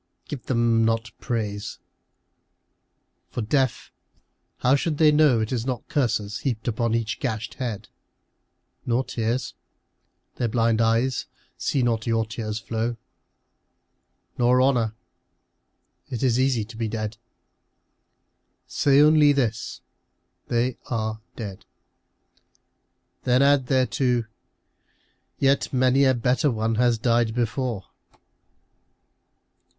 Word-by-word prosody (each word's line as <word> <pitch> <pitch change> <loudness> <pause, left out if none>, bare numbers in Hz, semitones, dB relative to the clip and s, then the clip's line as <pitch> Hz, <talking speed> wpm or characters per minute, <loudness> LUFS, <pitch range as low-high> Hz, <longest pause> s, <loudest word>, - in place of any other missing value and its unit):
Give 135 -5 -6
them 115 -2 +2
not 115 -1 0
praise. 105 -4 -3 1.5
For, 120 - -4
deaf, 130 +2 0 0.7
how 125 +3 +3
should 150 +2 -1
they 155 -1 +6
know 150 -6 +4
It 110 - -3
is 120 -3 -1
not 125 -2 -4
curses 110 -6 0
heaped 115 -5 -3
on 115 -1 +1
each 115 -1 -2
gashed 110 -3 -3
head? 120 -6 -5 1.0
Nor 120 +2 +1
tears. 115 +1 -2 0.8
Their 120 - 0
blind 115 0 +2
eyes 115 +3 +1 0.3
see 135 - 0
not 115 -2 0
your 115 -1 +1
tears 110 -1 -4
flow. 115 +1 -3 1.4
Nor 125 +1 +4
honour. 120 -5 +2 1.1
It 120 - -4
is 125 -2 +2
easy 130 -5 +1
to 110 +1 -12
be 115 -1 -1
dead. 110 0 -4 1.5
Say 140 -1 +3
only 150 -1 +6
this, 115 -5 -2 0.3
" - - -49
They 120 +1 0
are 110 -2 -2
dead." 100 -5 -7 1.6
Then 125 +2 +3
add 140 -2 +3
thereto, 130 -2 +1 0.6
" - - -41 0.3
Yet 135 0 +2
many 130 +1 +3
a 130 -1 +4
better 125 +5 +1
one 110 -2 -1
has 120 -2 +3
died 115 -1 +1
before." 120 -2 -2
120 Hz, 115 wpm, -24 LUFS, 110-130 Hz, 1.6 s, they